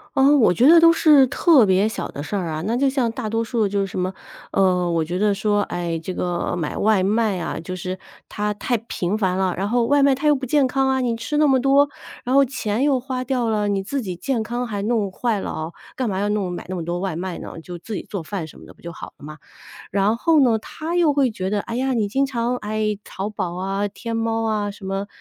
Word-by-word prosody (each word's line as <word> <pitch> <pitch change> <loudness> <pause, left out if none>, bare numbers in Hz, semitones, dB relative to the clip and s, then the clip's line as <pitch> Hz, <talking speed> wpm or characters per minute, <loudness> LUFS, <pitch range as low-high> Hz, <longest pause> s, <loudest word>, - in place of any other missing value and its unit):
嗯， 280 +1 +5
我 220 - +5
觉 240 - +4
得 335 +1 +8
都 330 0 +7
是 295 -5 +5
特 285 - +5
别 190 +3 +3
小 220 - -4
的 145 - -6
事 205 - -4
儿 180 -4 -1
啊， 155 0 -4
那 230 +3 0
就 275 +2 +2
像 255 -4 0
大 225 -2 -4
多 225 +1 0
数 225 -3 0
就 200 0 -1
是 - - 0
什 185 - -5
么 185 +1 -1 0.4
呃， 180 -2 +2
我 165 -2 +1
觉 180 +3 -3
得 205 -1 +2
说， 205 0 +1
哎， 170 -2 -3
这 180 +3 -5
个 175 0 -2
买 155 -3 -3
外 210 -3 +2
卖 210 -1 +1
啊， 165 - -4
就 185 +3 -6
是 185 +1 -5 0.3
它 210 0 -2
太 240 +3 -1
频 180 +4 -2
繁 190 -3 0
了， 190 -2 +1
然 195 +3 -2
后 240 0 +2
外 285 +2 +3
卖 275 -1 +4
它 300 +3 -1
又 295 - +5
不 260 -1 -4
健 285 +1 +3
康 265 +1 +1
啊， 265 0 +1
你 240 -2 0
吃 295 +6 -3
那 300 - +4
么 265 -2 +4
多， 275 +2 +4 0.4
然 255 +2 0
后 275 - +7
钱 240 -3 -2
又 275 -3 +3
花 255 0 -4
掉 245 -3 -1
了， 210 -1 0
你 195 -1 0
自 270 +6 -3
己 185 -5 -5
健 235 +5 -2
康 240 +3 -3
还 205 -3 -4
弄 210 -3 0
坏 225 -1 -1
了 - - -4
哦， 160 +2 -5 0.2
干 250 -4 -1
嘛 190 0 -2
要 205 - 0
弄 200 -4 -1
买 175 - -6
那 185 - -3
么 170 - -4
多 175 +1 -3
外 190 -4 -2
卖 180 0 -4
呢？ - - -8
就 175 +1 -8
自 215 +6 -8
己 - - -3
做 190 -5 -4
饭 175 -2 -5
什 - - -14
么 - - -13
的 - - -14
不 - - -25
就 170 - -7
好 - - -10
了 - - -16
吗？ 155 +1 -9 0.5
然 200 +3 +2
后 320 +3 +3
呢， 235 -5 +4
他 320 +9 -5
又 335 -4 +4
会 270 -4 +2
觉 190 -2 -3
得： 205 -1 0
“哎 230 - -6
呀， 260 +1 0
你 215 -4 +1
经 270 +7 +1
常 245 -1 -1
哎， 215 -1 -2
淘 195 +2 -5
宝 175 -4 -4
啊、 195 +2 -2
天 230 +3 -6
猫 225 0 -1
啊， 210 -2 0
什 200 -1 -10
么 195 +1 -3
215 Hz, 285 characters per minute, -22 LUFS, 190-255 Hz, 0.5 s, 得